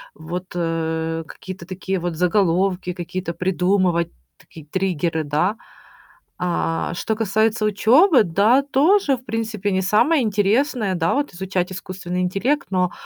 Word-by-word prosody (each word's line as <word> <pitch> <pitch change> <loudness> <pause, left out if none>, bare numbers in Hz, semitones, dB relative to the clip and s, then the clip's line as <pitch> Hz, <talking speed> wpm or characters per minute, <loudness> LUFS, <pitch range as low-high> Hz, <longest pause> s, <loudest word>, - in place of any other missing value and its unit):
вот, 175 +4 -6
э, 165 -1 -2
какие-то 185 -1 -9
такие 190 +1 -3
вот 175 -1 -3
заголовки 180 +1 +1
какие-то 175 0 -5
придумывать, 180 -1 +1 0.3
такие 160 -3 -14
триггеры, 170 -2 -1
да. 155 +8 0 0.9
А, 170 -2 -1
что 220 +4 -2
касается 220 0 +1
учёбы, 255 - +5
да, 205 +9 +3
тоже, 290 +3 +3
в 245 - -17
принципе, 220 -3 -2
не 190 0 +1
самое 215 - +3
интересное, 215 +1 +1
да, 165 -1 +1
вот 285 -5 -1
изучать 185 0 -2
искусственный 185 -1 -5
интеллект, 200 +11 0
но, 180 -2 +1
190 Hz, 130 wpm, -21 LUFS, 175-215 Hz, 0.9 s, учёбы